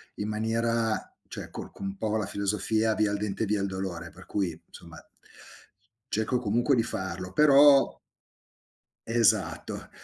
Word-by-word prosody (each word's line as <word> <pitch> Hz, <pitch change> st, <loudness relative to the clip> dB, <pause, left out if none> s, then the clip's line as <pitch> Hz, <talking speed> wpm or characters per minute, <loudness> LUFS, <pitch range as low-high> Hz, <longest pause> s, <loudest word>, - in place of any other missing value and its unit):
in 105 Hz, -, -4 dB
maniera 115 Hz, +1 st, -1 dB, 0.2 s
cioè -, -, -7 dB
col -, -, -8 dB
con -, -, -8 dB
un 95 Hz, -, -5 dB
po' 110 Hz, +1 st, -1 dB
la 105 Hz, -, -1 dB
filosofia 105 Hz, +2 st, 0 dB
via 105 Hz, -1 st, +1 dB
il 105 Hz, -, 0 dB
dente 105 Hz, +2 st, -2 dB
via 105 Hz, 0 st, 0 dB
il 100 Hz, -, 0 dB
dolore, 95 Hz, -3 st, -5 dB
per 90 Hz, -, -15 dB
cui 85 Hz, -5 st, -2 dB
insomma 85 Hz, -1 st, -13 dB, 1.1 s
cerco 110 Hz, +4 st, 0 dB
comunque 120 Hz, +4 st, +2 dB
di 115 Hz, -, +2 dB
farlo, 95 Hz, -3 st, -5 dB
però 145 Hz, -1 st, +6 dB, 1.1 s
Esatto. -, -, +1 dB
105 Hz, 145 wpm, -28 LUFS, 95-115 Hz, 1.1 s, però